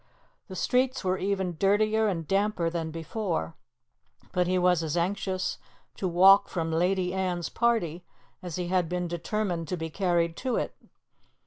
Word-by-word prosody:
The 190 - -8
streets 255 +6 +1
were 185 0 0
even 190 -3 -1
dirtier 215 +2 +3
and 165 -6 -2
damper 195 -4 +1
than 165 -2 -3
before, 165 - -3 0.8
but 180 -1 +1
he 185 +1 +2
was 180 -2 +3
as 160 0 -2
anxious 185 +1 -1 0.4
to 190 - -1
walk 195 +3 +6
from 165 -2 -2
Lady 180 +2 +1
Anne's 180 -3 -1
party 215 -8 0 0.4
as 175 -3 -6
he 180 -1 -3
had 180 -3 +1
been 180 0 -2
determined 175 0 -2
to 180 - -2
be 160 -1 -5
carried 170 -2 +1
to 255 -2 -1
it. - - -2
180 Hz, 155 wpm, -28 LUFS, 170-195 Hz, 0.8 s, walk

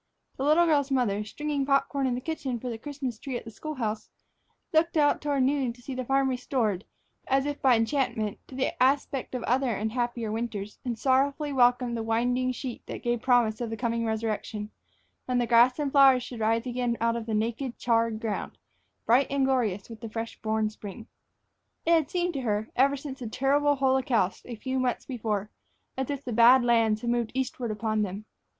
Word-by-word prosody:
The 265 - -3
little 310 +4 +5
girl's 290 -4 +2
mother, 230 -6 +1
stringing 290 +6 -3
pop 275 0 +2
corn 275 -2 -1
in 250 - 0
the 250 - -4
kitchen 270 -5 -3
for 250 - -5
the 225 - -6
Christmas 270 -4 -5
tree 265 -1 -4
at - - -9
the 225 - -8
school 310 +7 -6
house, 220 -4 -3 0.6
looked 325 +1 +3
out 290 -1 +3
toward 285 -3 +1
noon 265 -2 +1
to 245 - -19
see 270 - -5
the 255 0 -3
farm 270 +2 +2
restored, 245 -6 -1 0.4
as 270 +1 +2
if 290 0 -3
by 260 -4 +5
enchantment, 225 -3 0
to 260 - -11
the 260 -1 -2
aspect 270 0 +1
of 245 - -3
other 260 +1 +1
and 215 +2 -2
happier 240 -2 -2
winters; 215 -2 -4
and 240 -3 -3
sorrowfully 280 +4 +1
welcomed 245 -1 +3
the 230 - -2
winding 245 +3 +1
sheet 250 -1 -6
that - - -7
gave 240 -1 0
promise 240 -3 +2
of 235 - -2
the 225 - -4
coming 230 0 -1
resurrection, 220 -1 -3 0.5
when 250 -1 0
the 245 - +2
grass 240 +2 +5
and 290 -2 -1
flowers 270 -3 +6
should 245 -2 -8
rise 225 +2 +1
again 245 -1 -1
from 230 0 +1
out 230 -1 -4
the 220 - -1
naked, 235 +4 -2
charred 230 -2 +1
ground, 220 -3 -4 0.5
bright 250 +4 +4
and 275 -1 +1
glorious 225 -8 0
with 225 -2 -11
the 225 - -6
fresh 225 +1 -5
born 220 0 0
spring. 215 +1 -9 0.8
It 335 - +2
had 320 -4 +3
seemed 355 0 -1
to 275 - -3
her, 215 -2 -1
ever 275 +2 +3
since 275 -1 -7
the 240 -3 -5
terrible 285 +4 +2
holocaust 260 -7 +1
of - - -9
a - - -4
few 260 +4 -3
months 250 -1 -1
before, 215 -5 -3 0.4
as 265 +1 -3
if 280 -1 -4
the 245 - -3
Bad 240 +3 +7
Lands 225 -2 +3
had 235 - -1
moved 240 -2 0
eastward 255 -2 -2
upon 215 0 -1
them. 205 +1 -4
245 Hz, 210 wpm, -27 LUFS, 225-270 Hz, 0.8 s, Bad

